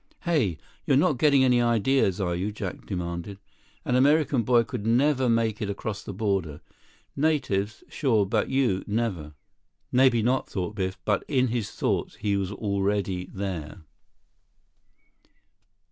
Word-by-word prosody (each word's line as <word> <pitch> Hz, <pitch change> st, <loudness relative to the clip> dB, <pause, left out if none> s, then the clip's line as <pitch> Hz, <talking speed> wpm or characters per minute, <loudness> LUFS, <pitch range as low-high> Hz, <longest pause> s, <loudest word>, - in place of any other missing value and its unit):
"Hey! 140 Hz, -, +1 dB, 0.3 s
You're 135 Hz, -, +4 dB
not 150 Hz, -4 st, +2 dB
getting 140 Hz, -3 st, +5 dB
any 125 Hz, -2 st, +4 dB
ideas, 120 Hz, -3 st, +2 dB
are 90 Hz, -3 st, 0 dB
you?" 95 Hz, +4 st, -2 dB
Jack 100 Hz, -3 st, -6 dB
demanded. 90 Hz, +1 st, -4 dB, 0.5 s
"An 125 Hz, -, +1 dB
American 140 Hz, 0 st, +3 dB
boy 120 Hz, +1 st, +3 dB
could 100 Hz, -, -6 dB
never 130 Hz, +3 st, +2 dB
make 115 Hz, -2 st, +1 dB
it 105 Hz, -, -2 dB
across 100 Hz, +1 st, -4 dB
the -, -, -7 dB
border. 95 Hz, -7 st, -2 dB, 0.6 s
Natives, 110 Hz, -9 st, 0 dB
sure—but 110 Hz, -9 st, +1 dB
you—never." 100 Hz, -, -1 dB, 0.6 s
Maybe 125 Hz, -3 st, +4 dB
not, 130 Hz, +3 st, 0 dB
thought 95 Hz, +1 st, -3 dB
Biff, 95 Hz, -2 st, -3 dB
but 105 Hz, -2 st, +1 dB
in 130 Hz, -3 st, +2 dB
his 115 Hz, -3 st, -2 dB
thoughts, -, -, -2 dB
he 100 Hz, -2 st, -1 dB
was 100 Hz, -1 st, -2 dB
already 100 Hz, -2 st, -1 dB
there. 95 Hz, -3 st, -5 dB
105 Hz, 130 wpm, -26 LUFS, 95-130 Hz, 0.6 s, getting